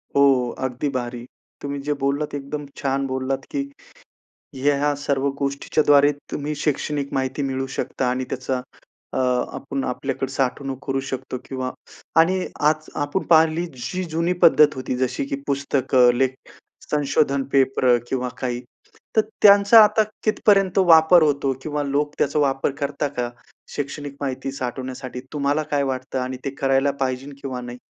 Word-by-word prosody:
हो, 135 -3 +4
अगदी 130 +2 -2
भारी. 120 -2 -4 0.4
तुम्ही 140 0 -4
जे 150 - +2
बोललात 140 +2 -1
एकदम 145 +1 -5
छान 135 0 -1
बोललात 130 0 -2
की 285 - +1 0.9
हे 135 +2 +2
ह्या 145 +1 +1
सर्व 140 -1 0
गोष्टीच्याद्वारे 140 +1 +3 0.2
तुम्ही 150 +1 -3
शैक्षणिक 145 -1 -2
माहिती 130 +2 -1
मिळवू 135 -1 -2
शकता 130 0 -1
आणि 130 +1 -1
त्याचा 130 0 -2 0.5
अ, - - -1 0.3
आपण 135 0 -4
आपल्याकडे 135 +1 -3
साठवणूक 135 0 -2
करू 135 0 0
शकतो 130 -1 -4
किंवा 130 -1 -4 0.5
आणि 185 +3 +3 0.2
आज 155 0 -3
आपण 145 +6 -1
पाहिली 160 +1 +4
जी 180 +9 -4
जुनी 165 +3 +1
पद्धत 150 -2 +6
होती 130 -1 -3
जशी 130 +1 -1
की 140 - -3
पुस्तकं, 135 -3 +3
लेख, 130 0 +2 0.6
संशोधन 140 -1 +1
पेपर 130 -2 +4
किंवा 125 -1 -2
काही. 125 -1 -3 0.5
तर 220 - +6 0.2
त्यांचा 205 +2 +8
आता 215 +1 +3 0.2
कितपर्यंत 200 -3 +3
वापर 160 +2 +7
होतो? 140 -2 +1
किंवा 150 0 -2
लोक 145 +1 -1
त्याचा 145 +2 +1
वापर 135 -1 +1
करतात 140 +1 -2
का? 120 -1 -1 0.5
शैक्षणिक 145 0 -5
माहिती 135 -1 -3
साठवण्यासाठी 130 0 -5
तुम्हाला 145 +1 0
काय 145 -1 +2
वाटतं 130 -1 -3
आणि 130 0 -3
ते 135 - 0
करायला 135 +1 +2
पाहिजे 130 +1 -2
किंवा 130 -2 -4
नाही? 120 0 -8
140 Hz, 145 wpm, -22 LUFS, 130-150 Hz, 0.9 s, त्यांचा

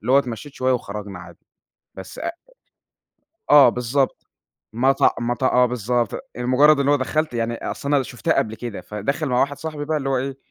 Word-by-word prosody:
اللي 120 +5 -1
هو 135 - +7
اتمشيت 125 +1 -4
شوية 130 0 +1
وخرجنا 105 -5 -5
عادي، 85 -1 -14 0.5
بس 95 0 -9
أ - - -2 1.2
آه 145 -3 +8
بالضبط، 125 +3 -1 0.5
مط 130 +4 +2 0.2
مط 120 +2 -2
آه 125 -1 +4
بالضبط، 120 0 -1 0.2
لمجرد 140 +5 +4
اللي 140 +1 +2
هو 145 - +5
دخلت 150 +1 -1
يعني 115 0 -1
أصل 140 +4 -3
أنا 140 - +3
شُفْتها 120 -1 -2
قبل 110 0 0
كده، 120 -4 -6
فداخل 140 +9 -3
مع 125 0 +1
واحد 145 0 0
صاحبي 155 -1 -5
بقى 155 +1 -1
اللي 135 -2 -2
هو 135 - +1
إيه، 135 +1 -4
125 Hz, 185 wpm, -22 LUFS, 115-140 Hz, 1.2 s, آه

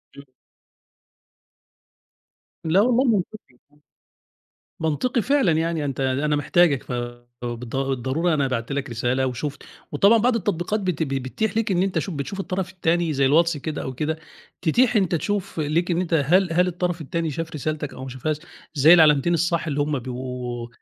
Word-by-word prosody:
امم. 140 - -12 2.4
لا 170 +5 +3
والله 245 +2 +3
منطقي، 215 - -1
آه. - - -25 1.3
منطقي 190 - 0
فعلًا 270 - +3
يعني 160 -1 0
أنت 135 -2 -3
أنا 140 +3 +1
محتاجك 145 -1 +3
ف - - -8 0.5
بالض 120 +1 -5
الضرورة 135 +5 0
أنا 140 -3 +1
بعت 115 0 -3
لك 140 -1 -3
رسالة 125 +3 0
وشُفت 135 +3 -4 0.3
وطبعًا 200 +10 +5
بعض 240 +1 +2
التطبيقات 205 +1 -1
بت 180 -4 -1
بت 135 -3 -2
بتتيح 160 - -2
ليك 225 -1 0
إن 180 0 +2
أنت 195 -1 0
شوف 190 - -3
بتشوف 175 +8 -4
الطرف 190 -1 -3
التاني 170 -2 0
زي 135 -1 +2
الواتس 165 +3 +3
كده 150 +2 -4
أو 130 - -4
كده 155 +4 -2 0.4
تتيح 240 +9 +3
أنت 190 -4 +2
تشوف 195 +3 -2
ليك 160 +4 0
إن 170 0 +1
أنت 180 -2 -1
هل 170 +4 +3
هل 180 +2 +3
الطرف 180 -1 -2
التاني 160 +2 -2
شاف 165 +3 -5
رسالتك 150 0 -3
أو - - -9
ما 130 - -6
شافهاش 130 +4 -2 0.4
زي 150 +4 +7
العلامتين 160 0 +5
الصح 170 0 0
اللي 145 -2 -1
هم 145 -1 0
بيبقوا 125 -1 -5
160 Hz, 165 wpm, -23 LUFS, 135-180 Hz, 2.4 s, زي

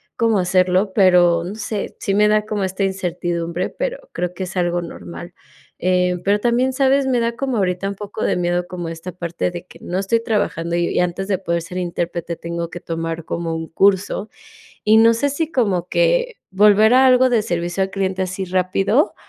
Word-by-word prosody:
como 225 -4 +2
hacerlo, 185 +2 +2
pero 175 -4 +4
no 190 +4 -6
sé, 210 -1 -4
sí 195 - -1
me 210 0 +4
da 210 0 +3
como 210 -2 -2
esta 190 +1 -2
incertidumbre, 175 -2 -2
pero - - -5
creo 180 0 -3
que 185 - -5
es 185 +1 -7
algo 175 0 0
normal. 85 - -9 0.5
Eh, 180 0 +1
pero 205 +1 +2
también, 245 +3 +1
¿sabes? 270 +1 +3
me 250 -2 +2
da 230 0 0
como 265 -3 -2
ahorita 185 0 0
un 200 - -5
poco 205 +2 -6
de - - +1
miedo 175 0 0
como 175 -2 -6
esta 165 +2 -7
parte 175 0 -3
de 175 0 -7
que - - -15
no 180 +2 -3
estoy 230 +4 0
trabajando 170 -6 -1
y 175 0 0
antes 180 +2 -1
de 195 -2 +1
poder 170 -2 -1
ser 180 +2 -7
intérprete 170 -1 -3
tengo 170 0 -5
que 175 - -7
tomar 165 -1 -4
como 165 -1 -3
un 160 0 -4
curso, 195 +3 +1 0.6
y 215 +1 +6
no 230 +1 +6
sé 285 +5 0
si 315 +3 -2
como 195 - 0
que - - +1 0.2
volver 210 +3 +5
a 260 +1 +6
algo 255 0 +5
de 235 -3 +3
servicio 175 +1 -2
al 190 - -1
cliente 190 -1 -1
así 185 +1 -3
rápido 190 - +1
190 Hz, 200 wpm, -20 LUFS, 175-215 Hz, 0.6 s, y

